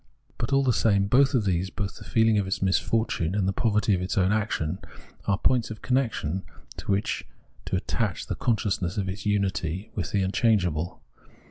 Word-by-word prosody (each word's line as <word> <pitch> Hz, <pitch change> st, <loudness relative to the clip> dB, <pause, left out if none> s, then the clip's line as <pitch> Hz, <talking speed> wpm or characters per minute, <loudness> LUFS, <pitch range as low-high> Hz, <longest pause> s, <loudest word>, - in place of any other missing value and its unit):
But 120 Hz, -, -2 dB
all 135 Hz, 0 st, +4 dB
tbe 125 Hz, -, +3 dB
same 100 Hz, -4 st, +3 dB
both 135 Hz, +7 st, +4 dB
of 115 Hz, -5 st, +2 dB
these, 95 Hz, 0 st, 0 dB
both 100 Hz, 0 st, -4 dB
the -, -, -10 dB
feeling 110 Hz, -2 st, +3 dB
of 100 Hz, -, -1 dB
its 95 Hz, -, -1 dB
misfortune 95 Hz, -2 st, +1 dB
and 100 Hz, -2 st, +1 dB
the 95 Hz, -, +1 dB
poverty 105 Hz, -2 st, +2 dB
of 90 Hz, -, +1 dB
its 90 Hz, -, -2 dB
own 95 Hz, 0 st, +3 dB
action, 100 Hz, -5 st, -1 dB, 0.5 s
are 100 Hz, -, +3 dB
points 120 Hz, +1 st, +2 dB
of 110 Hz, -1 st, -8 dB
connection 115 Hz, -, 0 dB, 0.4 s
to -, -, -9 dB
wbicb 100 Hz, +1 st, 0 dB, 0.4 s
to -, -, -1 dB
attach -, -, -1 dB
the -, -, -3 dB
consciousness 100 Hz, -6 st, -1 dB
of 100 Hz, -2 st, -1 dB
its 100 Hz, +3 st, -4 dB
unity 95 Hz, -2 st, -1 dB
with 90 Hz, -5 st, -3 dB
the 100 Hz, -2 st, +1 dB
unchangeable. 90 Hz, -5 st, +1 dB
100 Hz, 190 wpm, -26 LUFS, 95-110 Hz, 0.5 s, all